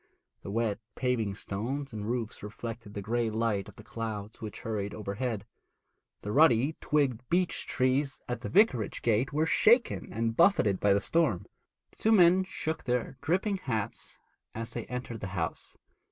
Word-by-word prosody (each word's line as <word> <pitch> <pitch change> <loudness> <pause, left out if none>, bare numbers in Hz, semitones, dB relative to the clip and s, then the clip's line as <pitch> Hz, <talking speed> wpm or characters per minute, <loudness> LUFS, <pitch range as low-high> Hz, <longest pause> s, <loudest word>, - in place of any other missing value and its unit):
The - - -7
wet 110 0 0 0.2
paving 115 -6 0
stones 125 +8 -4
and 105 0 -4
roofs 120 -3 -3
reflected 110 0 -7
the 100 - -4
grey 115 +2 0
light 110 -2 -1
of - - -15
the 105 - -12
clouds 110 -1 -5
which 105 -3 -6
hurried 105 -2 -3
overhead. 105 +1 -3 0.8
The 105 - -4
ruddy 140 +1 +5
twigged 135 -6 +1
beech 180 0 +1
trees 135 +1 +1
at 120 -1 -3
the - - -4
vicarage 165 - +3
gate 120 +3 +2
were 155 +2 +1
shaken 235 +7 +3
and 115 +1 -1
buffeted 140 - +4
by 100 -1 +4
the 100 - +2
storm. 110 - +1 0.5
The - - -24
two 220 - +2
men 185 -1 +6
shook 160 -3 -4
their 125 +1 -1
dripping 190 +5 +1
hats 115 - -4 0.4
as 115 +1 -4
they 115 -1 -5
entered 125 -2 -5
the 95 - -4
house. 80 -1 -4
115 Hz, 165 wpm, -30 LUFS, 105-140 Hz, 0.8 s, men